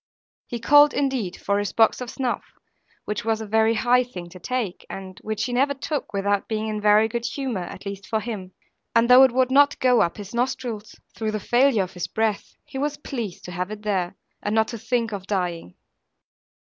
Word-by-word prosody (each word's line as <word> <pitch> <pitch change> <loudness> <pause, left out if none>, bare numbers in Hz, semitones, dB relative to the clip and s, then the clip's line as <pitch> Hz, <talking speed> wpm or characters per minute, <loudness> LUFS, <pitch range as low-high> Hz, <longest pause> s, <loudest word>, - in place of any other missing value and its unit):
He 240 - -4
called 290 +5 +6
indeed 260 -10 -1
for 200 0 0
his 205 -1 -2
box 225 +2 +3
of 250 - -5
snuff, 255 -2 -2 0.6
which 210 0 -3
was 220 0 0
a 220 - -5
very 220 +2 +3
high 245 +3 +3
thing 180 -8 -9
to 185 +1 -12
take; 230 -2 -3
and 190 0 -8
which 215 0 -3
he 245 - -2
never 275 +3 +2
took 285 +1 -4
without 200 0 0
being 220 0 -2
in 215 -1 -3
very 210 +1 +5
good 235 +1 -3
humour, 245 -7 -3
at 190 - -10
least 200 -1 -6
for 220 - 0
him. 210 -5 -6 0.4
And 230 0 +5
though 250 +1 +9
it 265 -2 +7
would 255 +1 +2
not 285 +1 +5
go 250 -2 +4
up 170 - 0
his 205 0 -8
nostrils, 240 -3 -3 0.2
through 220 -1 -2
the 215 - -1
failure 240 0 +3
of 185 - -8
his 180 - -4
breath, 220 -2 -2
he 275 -2 -7
was 290 +1 -1
pleased 235 -10 -6
to 180 - -7
have 180 +2 -3
it 215 0 -8
there, 190 -4 -1 0.3
and 205 +1 -1
not 220 0 +3
to 230 - -6
think 230 0 -1
of 195 -2 -6
dying. 175 - -2
220 Hz, 210 wpm, -24 LUFS, 200-250 Hz, 0.6 s, though